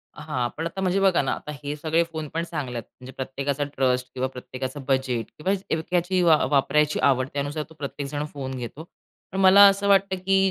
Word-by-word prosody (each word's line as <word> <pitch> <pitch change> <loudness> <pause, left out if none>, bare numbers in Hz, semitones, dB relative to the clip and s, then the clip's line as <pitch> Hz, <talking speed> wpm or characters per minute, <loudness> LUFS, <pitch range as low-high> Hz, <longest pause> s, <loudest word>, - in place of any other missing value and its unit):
हां, 150 -5 -2
पण 160 - -3
आता 190 +3 -6
म्हणजे 190 +1 +1
बघा 195 -2 +4
ना, 135 - -1
आता 150 - -5
हे 145 +1 -3
सगळे 160 +2 +1
फोन 160 -2 -6
पण 165 +1 -1
चांगले 150 -7 -5
आहेत. 115 - -4 0.2
म्हणजे 130 +1 -10
प्रत्येकाचा 135 +2 -2
ट्रस्ट 130 -3 0
किंवा 130 0 -1
प्रत्येकाचं 130 +1 -7
बजेट 130 -4 0
किंवा 185 +6 0 0.2
एवक्यातली 175 +3 0
वा 165 -3 +6
वापरायची 150 +2 +2
आवड, 130 -1 +3
त्यानुसार 145 +2 -2
तो - - -14
प्रत्येकजण 145 +1 -4
फोन 135 -2 -5
घेतो. 125 +5 -7 0.5
पण 190 - -3
मला 190 +1 +8
असं 200 0 +2
वाटतं 195 -1 +4
की 195 0 +3
150 Hz, 195 wpm, -25 LUFS, 130-170 Hz, 0.5 s, मला